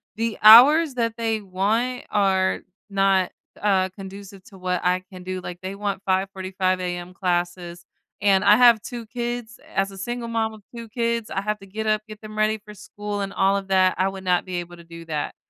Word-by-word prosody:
the 230 -1 -2
hours 270 +8 +8
that 230 -2 -1
they 225 -2 -1
want 215 +7 -1
are 190 -2 +1 0.3
not, 195 -2 +2 0.3
uh, 190 -2 +2
conducive 195 +1 -11
to 195 - -15
what 180 -1 -1
I 180 +1 +1
can 180 -1 -10
do. 185 0 -4
Like 175 0 -7
they 190 +1 -5
want 200 -1 -3
05:45 190 -1 -1
AM 175 0 -5
classes 175 -1 -2 0.4
and 195 -1 +3
I 210 - +8
have 235 -2 +6
2 240 -3 -7
kids. 240 -1 -5 0.2
As 195 0 +1
a 195 - -11
single 240 +3 -4
mom 225 -1 -1
of 215 - -13
2 230 -1 -7
kids, 235 -1 -1
I 195 - -2
have 210 +1 -2
to 195 - -13
get 215 +3 -5
up, 215 0 +2
get 215 0 -11
them 215 0 -10
ready 215 0 +2
for 210 - -11
school 205 0 -6
and 195 0 -4
all 195 +1 +2
of 195 -1 -6
that. 185 -1 +3
I 190 - +2
would 190 0 -6
not 180 0 +1
be 185 -1 -5
able 175 0 -11
to 170 - -13
do 170 0 -11
that, 150 -2 -3
195 Hz, 210 wpm, -23 LUFS, 185-220 Hz, 0.4 s, hours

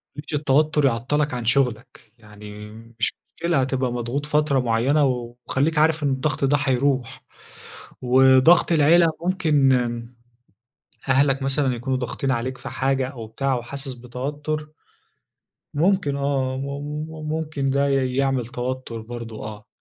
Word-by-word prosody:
ما 145 - -6
تخلّيش 150 - -9
التوتر 150 +1 +2
يعطلك 135 +4 0
عن 120 -2 -4
شغلك. 125 -2 -1
يعني 105 -1 -11 0.3
مش - - +1 0.3
مشكلة، 170 -4 +1
هتبقى 130 -1 -1
مضغوط 120 +4 -3
فترة 150 -2 +2
معينة 125 +5 +2
وخليك 125 +5 -1
عارف 155 0 +3
إن 140 - +2
الضغط 135 +2 -1
ده 145 +2 +3
هيروح. 135 -2 0 0.8
وضغط 130 +7 +5
العيلة، 165 +2 +5
ممكن 155 -7 +2 1.4
أهلك 135 +1 +3
مثلًا 135 -1 0
يكونوا 130 +2 -2
ضاغطين 130 +2 -2
عليك 130 +1 -2
في - - -8
حاجة 135 -1 0
أو 120 -5 -8
بتاع 135 +4 -1
وحاسس 135 +2 -6
بتوتر 145 +5 -5 1.0
ممكن 165 -3 +1
آه، 135 -2 -1
مم 145 +3 -4 0.2
ممكن 155 -3 -2
ده 140 +1 +2
ي 130 -2 0
يعمل 135 -3 +1
توتر 125 -1 -5
برضو، 115 -1 -8
آه. 105 -1 -8
135 Hz, 130 wpm, -23 LUFS, 125-145 Hz, 1.4 s, وضغط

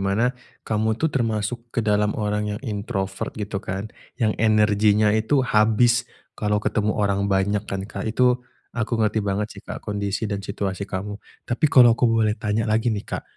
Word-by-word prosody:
mana 100 +6 +1 0.3
kamu 110 0 0
itu 160 +2 0
termasuk 115 -1 -1
ke 115 -2 -2
dalam 105 0 +1
orang 105 0 -1
yang - - -9
introvert, 100 -3 -3
gitu 105 -2 -4
kan? 100 +1 -5 0.2
Yang 110 -4 +1
energinya 105 -1 +4
itu 120 +5 +2
habis, 115 +1 +3 0.2
kalau 105 -1 -1
ketemu 105 0 0
orang 100 -1 +1
banyak 100 +1 +1
kan, 95 0 -3
Kak? 110 - -5
Itu, 125 +2 +2 0.3
aku 115 0 -1
ngerti 110 0 +1
banget 100 +1 -1
sih, - - -11
Kak, - - -8
kondisi 100 +1 -2
dan 100 -1 -2
situasi 100 0 -4
kamu. 100 +2 -5 0.2
Tapi 120 +5 -2
kalau 120 -4 +7
aku 120 +1 +2
boleh 110 -2 +2
tanya 105 +1 0
lagi 110 +2 +1
nih, 105 -3 -2
Kak, - - -5
105 Hz, 175 wpm, -23 LUFS, 100-115 Hz, 0.3 s, kalau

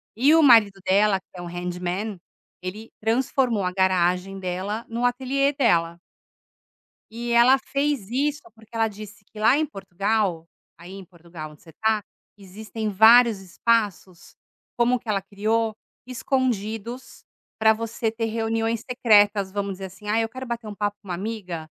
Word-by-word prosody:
e 275 +8 +4
o 325 - +5
marido 220 -7 +6
dela, 200 +1 +3
que - - -35
é 180 - -8
um 175 - -7
handman, 180 +3 -4 0.4
ele 205 +5 -7
transformou 235 -1 0
a 180 - -1
garagem 185 0 +1
dela 190 +5 -4
no 230 +1 -4
ateliê 265 +3 +1
dela. 170 -12 +1 1.1
E 235 +2 -5
ela 240 +3 +6
fez 275 -5 -2
isso, 290 +4 -1
porque 220 -1 -20
ela 225 -1 +1
disse 210 0 -11
que 215 - -15
lá 225 +5 +4
em 310 +1 +1
Portugal 195 - -2 0.3
aí 175 +2 -11
em 195 0 -9
Portugal, 170 -3 -11
onde 150 - -19
você 160 - -16
tá, 220 +2 0 0.3
existem 210 +2 -6
vários 220 +1 +6
espaços, 190 -2 -2 0.4
como 240 +1 +3
o - - -4
que 235 - -17
ela 200 -2 0
criou, 215 +3 -1 0.3
escondidos 245 -2 -3 0.3
para 220 0 +5
você 225 +1 -3
ter 225 0 -2
reuniões 225 0 -1
secretas, 205 -5 +3
vamos 200 -1 -3
dizer 190 +1 -7
assim: 190 +3 -14
"Ai, 220 +2 +2
eu - - -4
quero 260 +3 -8
bater 235 -1 -5
um 210 - -6
papo 205 0 -2
com 200 - -17
uma 180 - -2
amiga, 185 -4 -5
215 Hz, 160 wpm, -24 LUFS, 190-235 Hz, 1.1 s, marido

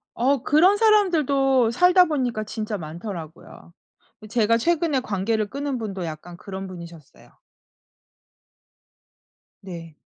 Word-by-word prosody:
어 260 +2 +1
그런 360 +7 +4
사람들도 285 - +3
살다 360 +6 +5
보니까 250 -8 -2
진짜 215 0 -5
많더라고요. 170 0 -9 0.5
어 - - -10
제가 230 0 +2
최근에 320 0 +1
관계를 215 -1 -2
끊은 280 -1 -3
분도 195 -6 -5
약간 160 +2 -8
그런 195 0 -7
분이셨어요. 170 -4 -12 2.3
네. 165 -5 -10
225 Hz, 250 characters per minute, -23 LUFS, 185-285 Hz, 2.3 s, 살다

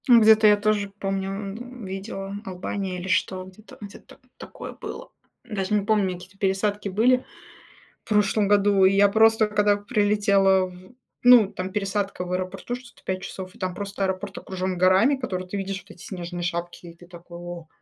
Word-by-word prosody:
Ну, 240 -3 +8
где-то 220 0 +7
я 210 0 +6
тоже 205 -1 0
помню, 195 0 -2
м, 215 +4 -7
видела 195 +1 -6
Албания 185 0 -4
или 180 - -6
что 190 -1 0
где-то 190 +4 -15
где-то 205 -1 -12 0.2
такое - - -9
было. - - -8 0.3
Даже 210 -5 -3
не 205 -1 0
помню, 205 -3 +2
какие-то 185 +2 -12
пересадки 200 +1 0
были 245 +6 +3 0.8
в - - -20
прошлом 210 -1 +2
году. 200 -1 +4
И 190 - +6
я 200 +1 +5
просто 220 +1 +4
когда 210 -1 +2
прилетела, 205 -3 +2
в 185 +4 -15 0.3
ну 245 -5 +7
там 185 +1 -4
пересадка 195 -1 -2
в 180 - -6
аэропорту 185 +5 -3
что-то 245 -1 -12
5 185 0 -3
часов, 190 -1 -8
и - - -18
там 185 -3 -3
просто 200 +1 -5
аэропорт 190 +1 -3
окружен 185 0 -4
горами, 185 +9 +4
которые 185 -8 -4
ты 200 - -4
видишь, 195 0 -3
вот 200 +3 -15
эти 175 - -15
снежные 175 -2 -6
шапки. 175 0 -4
И 170 - -12
ты 175 - -16
такой: 175 0 -12
"О!" 175 -2 -8
195 Hz, 180 wpm, -24 LUFS, 185-210 Hz, 0.8 s, Ну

